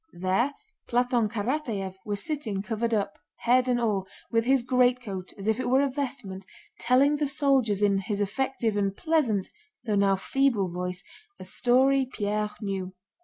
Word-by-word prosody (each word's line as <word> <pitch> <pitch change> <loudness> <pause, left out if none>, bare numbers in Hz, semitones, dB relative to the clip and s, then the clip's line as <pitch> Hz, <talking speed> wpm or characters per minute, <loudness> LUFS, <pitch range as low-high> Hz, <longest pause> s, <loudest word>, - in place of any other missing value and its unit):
There 195 +10 +1 0.3
Platón 245 -2 +2
Karatáev 220 -4 -2
was 205 -1 -4
sitting 240 -11 -2
covered 230 +1 -2
up—head 235 +4 0
and 245 -1 +2
all—with 220 +1 -1
his 265 -1 +3
greatcoat 245 -7 +1
as 195 - -8
if 220 +2 +1
it 255 - -1
were 265 +2 +4
a 280 - +1
vestment, 255 -9 -4 0.4
telling 265 +5 +3
the 295 -1 0
soldiers 270 -8 +2
in 200 -1 +3
his 200 +1 -3
effective 225 +1 -1
and 200 -1 0
pleasant 275 - +1 0.4
though 215 - 0
now 200 -1 +3
feeble 225 -2 +1
voice 180 +1 -4 0.4
a - - -7
story 260 +6 +3
Pierre 210 -1 -1
knew. 190 -2 -3
230 Hz, 150 wpm, -27 LUFS, 200-260 Hz, 0.4 s, were